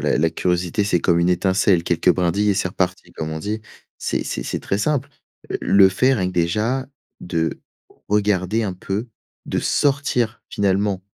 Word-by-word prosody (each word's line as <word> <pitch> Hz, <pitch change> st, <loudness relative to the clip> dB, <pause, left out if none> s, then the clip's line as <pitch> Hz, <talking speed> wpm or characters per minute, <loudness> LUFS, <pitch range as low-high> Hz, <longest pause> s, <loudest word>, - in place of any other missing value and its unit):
la -, -, +1 dB
la 80 Hz, +1 st, +2 dB
curiosité, 90 Hz, +3 st, 0 dB
c'est 90 Hz, -4 st, +1 dB
comme 85 Hz, 0 st, +3 dB
une 85 Hz, +1 st, +2 dB
étincelle, 95 Hz, 0 st, +2 dB
quelques 85 Hz, +1 st, +2 dB
brindilles 95 Hz, +4 st, +1 dB
et 100 Hz, -, +2 dB
c'est 95 Hz, -1 st, 0 dB
reparti, 90 Hz, 0 st, -2 dB
comme 80 Hz, 0 st, -5 dB
on 80 Hz, -, -4 dB
dit. 105 Hz, +6 st, -3 dB, 0.4 s
C'est -, -, -1 dB
c'est -, -, -3 dB
c'est -, -, -3 dB
très 100 Hz, -, -2 dB
simple, 145 Hz, +4 st, 0 dB, 0.4 s
heu, -, -, -1 dB
le 100 Hz, -1 st, +6 dB
fait 125 Hz, +8 st, +2 dB
rien 95 Hz, -6 st, 0 dB
que, -, -, -6 dB
déjà, 105 Hz, +10 st, 0 dB, 0.3 s
de 80 Hz, -2 st, -2 dB, 0.5 s
regarder 105 Hz, +1 st, +1 dB
un 95 Hz, -4 st, -2 dB
peu, 100 Hz, +6 st, -4 dB, 0.4 s
de -, -, -1 dB
sortir, 125 Hz, -5 st, 0 dB
finalement, 100 Hz, -1 st, 0 dB
95 Hz, 175 wpm, -21 LUFS, 90-105 Hz, 0.5 s, le